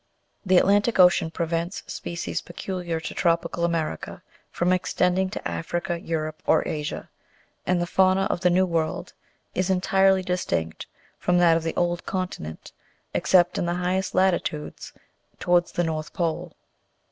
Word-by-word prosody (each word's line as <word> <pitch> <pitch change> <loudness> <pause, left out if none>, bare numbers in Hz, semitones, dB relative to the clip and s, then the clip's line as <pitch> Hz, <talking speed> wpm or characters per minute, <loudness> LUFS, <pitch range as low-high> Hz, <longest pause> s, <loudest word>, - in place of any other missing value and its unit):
The 185 -2 +4
Atlantic 205 +5 +3
Ocean 180 -2 +5
prevents 170 +3 -3
species 170 0 -4
peculiar 175 -2 -4
to - - -5
tropical 170 0 0
America, 165 - -2 0.3
from 180 +1 +1
extending 185 +1 +1
to - - -5
Africa, 170 - -3
Europe, 155 -1 -3
or - - +3
Asia; 150 -1 -4 0.6
and 180 -1 +2
the 175 - 0
fauna 190 +2 +3
of - - -1
the 180 0 +3
New 185 +2 +3
World 165 -3 -2 0.4
is 185 +1 0
entirely 190 0 +3
distinct 175 - -2 0.3
from 180 0 +2
that 170 -2 +5
of 165 - +1
the 165 0 -3
old 175 0 0
continent, 180 - -5 0.4
except 180 +2 +3
in 175 - -1
the 175 - 0
highest 185 +2 -1
latitudes, 175 -5 0 0.5
towards 175 -1 +2
the 175 - +1
north 155 -1 -3
pole. 165 -3 -2
175 Hz, 145 wpm, -25 LUFS, 165-185 Hz, 0.6 s, Ocean